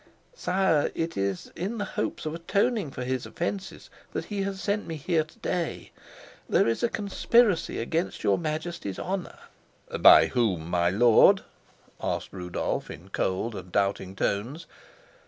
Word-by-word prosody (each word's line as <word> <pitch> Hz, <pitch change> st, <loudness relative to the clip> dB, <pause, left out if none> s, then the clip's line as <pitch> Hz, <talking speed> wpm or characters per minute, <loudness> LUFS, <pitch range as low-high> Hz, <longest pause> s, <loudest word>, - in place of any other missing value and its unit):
"Sire, 185 Hz, -, +1 dB
it 165 Hz, 0 st, -2 dB
is 95 Hz, -1 st, -2 dB
in 200 Hz, +7 st, -3 dB
the 205 Hz, -, -2 dB
hopes 190 Hz, -, -3 dB
of 155 Hz, -, -2 dB
atoning 200 Hz, -, 0 dB
for 130 Hz, -, -6 dB
his 130 Hz, 0 st, -2 dB
offences 190 Hz, +3 st, -5 dB, 0.2 s
that -, -, -3 dB
he 205 Hz, -2 st, -3 dB
has 195 Hz, 0 st, -3 dB
sent 205 Hz, +1 st, -1 dB
me 165 Hz, -, -4 dB
here 160 Hz, +2 st, +1 dB
to 155 Hz, -, -20 dB
day. 175 Hz, -2 st, -3 dB, 0.6 s
There -, -, +4 dB
is 115 Hz, -, 0 dB
a 235 Hz, -, +2 dB
conspiracy 210 Hz, -1 st, +2 dB
against 160 Hz, +10 st, -2 dB
your -, -, +3 dB
Majesty's 155 Hz, -, -4 dB
honor." 190 Hz, -1 st, -4 dB, 0.6 s
"By -, -, +9 dB
whom, 95 Hz, -10 st, 0 dB
my 85 Hz, -1 st, +3 dB
lord?" 110 Hz, +4 st, +6 dB, 0.6 s
asked -, -, -2 dB
Rudolf, 90 Hz, -2 st, -3 dB
in 85 Hz, +6 st, -10 dB
cold 95 Hz, +4 st, -1 dB
and 90 Hz, -3 st, -8 dB
doubting 100 Hz, -1 st, 0 dB
tones. 115 Hz, +12 st, -2 dB
155 Hz, 150 wpm, -27 LUFS, -, 0.6 s, By